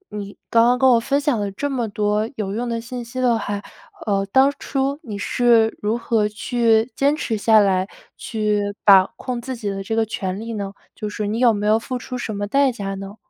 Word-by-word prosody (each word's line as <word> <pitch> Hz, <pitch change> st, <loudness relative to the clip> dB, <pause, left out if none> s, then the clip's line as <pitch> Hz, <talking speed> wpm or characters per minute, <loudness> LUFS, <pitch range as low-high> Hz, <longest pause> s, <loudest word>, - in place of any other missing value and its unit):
你 200 Hz, -1 st, -7 dB
刚 230 Hz, 0 st, +5 dB
刚 245 Hz, +1 st, +3 dB
跟 265 Hz, +1 st, +4 dB
我 235 Hz, -, +5 dB
分 280 Hz, +4 st, 0 dB
享 285 Hz, -5 st, 0 dB
了 205 Hz, -1 st, -2 dB
这 285 Hz, +8 st, -3 dB
么 240 Hz, -4 st, -1 dB
多 210 Hz, +2 st, 0 dB
有 200 Hz, -4 st, -3 dB
用 235 Hz, +3 st, -3 dB
的 230 Hz, 0 st, -2 dB
信 245 Hz, +1 st, -6 dB
息 245 Hz, +2 st, -7 dB
的 245 Hz, -2 st, +3 dB
话， 205 Hz, -1 st, -3 dB, 0.5 s
呃， 200 Hz, -2 st, +1 dB
当 265 Hz, +1 st, +5 dB
初 275 Hz, +1 st, -2 dB
你 215 Hz, -, -7 dB
是 230 Hz, +1 st, +3 dB
如 215 Hz, +3 st, 0 dB
何 225 Hz, -3 st, +1 dB
去 225 Hz, +1 st, +1 dB
坚 280 Hz, +2 st, +2 dB
持 235 Hz, -8 st, -2 dB
下 220 Hz, +1 st, +4 dB
来， 190 Hz, -2 st, +2 dB, 0.3 s
去 210 Hz, -2 st, -1 dB, 0.2 s
把 195 Hz, -2 st, +7 dB
控 250 Hz, -2 st, -4 dB
自 260 Hz, +1 st, -5 dB
己 215 Hz, -3 st, -4 dB
的 195 Hz, 0 st, -5 dB
这 220 Hz, +3 st, -3 dB
个 225 Hz, 0 st, +2 dB
权 190 Hz, -2 st, -4 dB
利 230 Hz, +1 st, -6 dB
呢？ 200 Hz, -2 st, -4 dB, 0.2 s
就 210 Hz, -, -5 dB
是， 210 Hz, 0 st, -4 dB
你 215 Hz, +3 st, -2 dB
有 245 Hz, -2 st, +5 dB
没 205 Hz, -1 st, -2 dB
有 215 Hz, +1 st, +4 dB
付 255 Hz, +2 st, -4 dB
出 250 Hz, +1 st, -7 dB
什 240 Hz, -3 st, -4 dB
么 205 Hz, 0 st, -2 dB
代 275 Hz, +4 st, +2 dB
价 195 Hz, -4 st, -5 dB
呢？ 195 Hz, +1 st, -8 dB
225 Hz, 245 characters per minute, -21 LUFS, 205-245 Hz, 0.5 s, 把